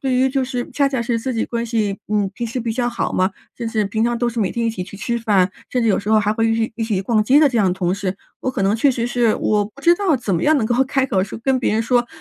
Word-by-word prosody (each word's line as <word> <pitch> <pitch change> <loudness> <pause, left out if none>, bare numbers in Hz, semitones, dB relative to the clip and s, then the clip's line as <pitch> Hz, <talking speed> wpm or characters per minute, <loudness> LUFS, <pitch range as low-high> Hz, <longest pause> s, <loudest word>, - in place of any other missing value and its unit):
对 265 -3 0
于 260 +1 +3
就 265 0 0
是 250 -1 -4
恰 280 -1 +2
恰 265 -4 -1
是 235 0 -1
自 255 +2 -3
己 225 - 0
关 235 -1 -3
系， 215 -4 -1
嗯， 205 -2 0
平 235 - -3
时 235 +3 -4
比 230 -1 -2
较 240 +1 0
好 235 - -2
嘛， 185 +1 +1 0.3
就 235 - -4
是 220 -2 0
平 220 +3 0
常 240 0 0
都 240 0 0
是 235 0 -5
每 200 -4 0
天 235 - -2
一 - - +1
起 185 -5 -5
去 200 - -11
吃 235 +3 -2
饭， 200 -5 +2 0.2
甚 250 - 0
至 230 - +2
有 205 - +3
时 200 - -6
候 215 0 +4
还 210 0 +1
会 225 +1 +1
一 225 - +2
起 225 +1 -1
一 225 - -1
起 205 -4 -1
逛 215 +1 +2
街 270 +6 +5
的 300 - +6
这 245 -3 -1
样 205 - +3
的 180 - +2
同 180 -1 -1
事， 195 -1 -3 0.2
我 260 - -1
可 200 - -3
能 195 +2 +2
确 275 +5 +3
实 240 -2 -1
是 240 -2 +2
我 210 -1 +1
不 215 +7 -13
知 340 +4 +5
道 370 -3 +1
怎 220 -6 -2
么 165 - -1
样 310 0 +4
能 225 - +1
够 240 - +1
开 270 0 0
口 190 -6 +1
说 195 - -6
跟 265 +1 +2
别 250 - 0
人 220 +1 +1
说， 240 +1 +2
230 Hz, 355 characters per minute, -20 LUFS, 210-250 Hz, 0.3 s, 的